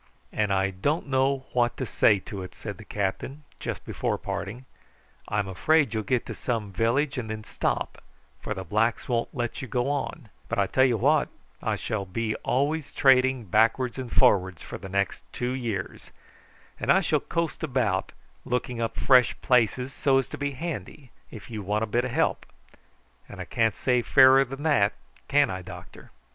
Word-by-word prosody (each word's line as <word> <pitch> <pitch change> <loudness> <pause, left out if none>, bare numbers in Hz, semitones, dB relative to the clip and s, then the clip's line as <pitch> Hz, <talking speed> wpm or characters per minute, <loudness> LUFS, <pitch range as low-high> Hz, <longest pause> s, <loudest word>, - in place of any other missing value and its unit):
"And 105 -2 0
I 95 0 +2
don't 145 - -1
know 135 0 +1
what 120 -1 +1
to 130 - -2
say 105 -2 +4
to 100 -2 -7
it," 90 - -9
said - - -7
the - - -9
captain 105 +9 -3 0.2
just - - -5
before - - -2
parting. 105 +7 -5 0.6
"I'm 105 -1 -1
afraid 140 - +2
you'll 110 - 0
get 120 +4 0
to - - -5
some 110 -5 -3
village 130 +7 +1
and 110 -3 -5
then 110 0 -5
stop, - - -2 0.4
for 105 - -4
the 95 - -5
blacks 110 +5 0
won't 120 -2 0
let 120 -3 -3
you 135 - -5
go 125 +4 0
on; 135 -5 -4 0.2
but - - -2
I 100 - +3
tell 130 +7 +3
you 120 -3 +2
what: 145 +6 +3 0.3
I - - 0
shall 100 -3 -3
be 110 +4 -2
always 145 +3 -1
trading 130 -2 +4
backwards 115 +5 +2
and 125 -3 -6
forwards 95 -4 +3
for - - -7
the 95 - -8
next 100 0 -1
two 125 0 -2
years, 115 -7 -4 0.7
and - - +2
I - - +5
shall - - +1
coast 170 -2 -3
about 125 -10 0 0.3
looking 125 -1 -2
up 115 - -2
fresh 125 -3 +4
places 125 +1 +2
so 135 0 +2
as 135 - +1
to - - -6
be 145 0 -2
handy 140 - -6 0.2
if 110 +1 -11
you 110 -2 -4
want 105 +3 -1
a - - +2
bit 120 +3 0
of 125 - -3
help; - - 0 0.8
and - - -10
I - - -4
can't 115 -3 +1
say 125 -2 +1
fairer 135 +2 +6
than 135 +3 -8
that, 140 -10 +3 0.3
can 145 -3 +3
I, 95 0 -4
doctor?" - - -11
120 Hz, 185 wpm, -26 LUFS, 105-135 Hz, 0.8 s, fairer